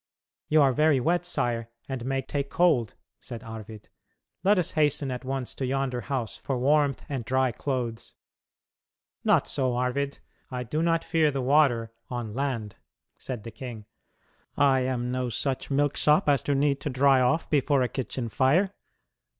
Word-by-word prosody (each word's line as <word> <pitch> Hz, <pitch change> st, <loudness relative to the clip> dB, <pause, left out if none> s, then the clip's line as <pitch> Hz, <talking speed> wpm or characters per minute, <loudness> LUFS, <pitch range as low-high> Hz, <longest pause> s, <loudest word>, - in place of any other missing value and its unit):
"You 155 Hz, -1 st, +5 dB
are 135 Hz, -2 st, +4 dB
very 150 Hz, 0 st, +3 dB
wet, 175 Hz, +6 st, +1 dB
sire, 115 Hz, -8 st, -1 dB, 0.2 s
and 130 Hz, -3 st, -4 dB
may 135 Hz, 0 st, -1 dB
take 140 Hz, +1 st, -3 dB
cold," 155 Hz, -11 st, +2 dB, 0.2 s
said 120 Hz, -2 st, -8 dB
Arvid; 110 Hz, -2 st, -9 dB, 0.6 s
"let 205 Hz, +2 st, +4 dB
us 180 Hz, -, +1 dB
hasten 145 Hz, -3 st, +1 dB
at 125 Hz, +1 st, -5 dB
once 130 Hz, -1 st, -3 dB
to -, -, -5 dB
yonder 130 Hz, -1 st, -1 dB
house 130 Hz, -5 st, -3 dB
for 135 Hz, -, -3 dB
warmth 140 Hz, +1 st, +2 dB
and 135 Hz, -4 st, -3 dB
dry 130 Hz, +2 st, +1 dB
clothes." 120 Hz, -2 st, -4 dB, 1.1 s
"Not -, -, +4 dB
so, 130 Hz, -3 st, 0 dB
Arvid; 125 Hz, +3 st, -1 dB, 0.3 s
I 125 Hz, -1 st, -4 dB
do 150 Hz, +7 st, -2 dB
not 165 Hz, 0 st, +2 dB
fear 160 Hz, -2 st, +2 dB
the 135 Hz, -2 st, -2 dB
water 125 Hz, -5 st, +3 dB, 0.2 s
on 120 Hz, -4 st, -4 dB
land," 120 Hz, -6 st, -3 dB, 0.4 s
said 125 Hz, -5 st, -6 dB
the 115 Hz, -, -7 dB
king. 115 Hz, -2 st, -8 dB, 0.7 s
"I 135 Hz, -2 st, +4 dB
am 125 Hz, -1 st, -1 dB
no 125 Hz, -1 st, -1 dB
such 130 Hz, +3 st, -2 dB
milksop 145 Hz, +2 st, +2 dB
as 140 Hz, -2 st, +4 dB
to 145 Hz, -, +1 dB
need 140 Hz, 0 st, +2 dB
to -, -, -2 dB
dry 135 Hz, 0 st, +4 dB
off 155 Hz, +6 st, +1 dB
before 140 Hz, -2 st, +3 dB
a -, -, +1 dB
kitchen 125 Hz, -1 st, -4 dB
fire. 150 Hz, -, +2 dB
135 Hz, 165 wpm, -27 LUFS, 125-145 Hz, 1.1 s, You